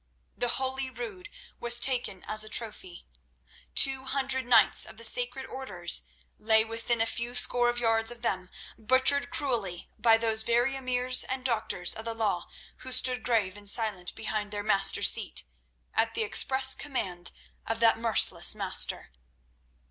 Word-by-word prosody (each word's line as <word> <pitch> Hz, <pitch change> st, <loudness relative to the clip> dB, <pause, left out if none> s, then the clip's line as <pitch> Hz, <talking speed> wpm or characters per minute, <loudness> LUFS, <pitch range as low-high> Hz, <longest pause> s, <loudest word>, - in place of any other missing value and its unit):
The 245 Hz, -, -3 dB
holy 265 Hz, 0 st, -3 dB
Rood 405 Hz, -, -9 dB, 0.3 s
was 240 Hz, 0 st, +5 dB
taken 240 Hz, -7 st, 0 dB
as 215 Hz, 0 st, -1 dB
a 215 Hz, -, -8 dB
trophy. 210 Hz, -6 st, -4 dB, 0.7 s
Two 265 Hz, -1 st, +3 dB
hundred 265 Hz, -1 st, -1 dB
knights 240 Hz, -2 st, +4 dB
of -, -, -12 dB
the 230 Hz, -, -9 dB
sacred 245 Hz, +3 st, 0 dB
Orders 175 Hz, -, -2 dB, 0.3 s
lay 220 Hz, 0 st, +2 dB
within 230 Hz, +1 st, -3 dB
a -, -, +2 dB
few 235 Hz, +2 st, -4 dB
score 245 Hz, -1 st, +2 dB
of 240 Hz, -, -3 dB
yards 225 Hz, -1 st, +1 dB
of 240 Hz, 0 st, -8 dB
them, 185 Hz, -5 st, -3 dB, 0.3 s
butchered 260 Hz, +5 st, +1 dB
cruelly 220 Hz, -11 st, -3 dB
by 225 Hz, -1 st, +4 dB
those 225 Hz, -1 st, +2 dB
very 240 Hz, +4 st, 0 dB
emirs 255 Hz, -1 st, +1 dB
and 260 Hz, 0 st, -4 dB
doctors 215 Hz, -7 st, 0 dB
of 220 Hz, -, -7 dB
the 230 Hz, 0 st, -4 dB
law 210 Hz, -6 st, -3 dB, 0.3 s
who 260 Hz, -, -9 dB
stood 255 Hz, 0 st, +3 dB
grave 210 Hz, -6 st, -1 dB
and 205 Hz, -1 st, -5 dB
silent 205 Hz, -5 st, -1 dB
behind 215 Hz, -1 st, -4 dB
their 205 Hz, -1 st, -5 dB
master's 195 Hz, -2 st, +5 dB
seat, -, -, +1 dB, 0.5 s
at -, -, -1 dB
the 455 Hz, -, -1 dB
express 265 Hz, -10 st, +4 dB
command 190 Hz, -11 st, -3 dB, 0.4 s
of 225 Hz, 0 st, -3 dB
that 225 Hz, -1 st, +3 dB
merciless 230 Hz, -1 st, +3 dB
master. -, -, 0 dB
235 Hz, 155 wpm, -27 LUFS, 215-260 Hz, 0.7 s, was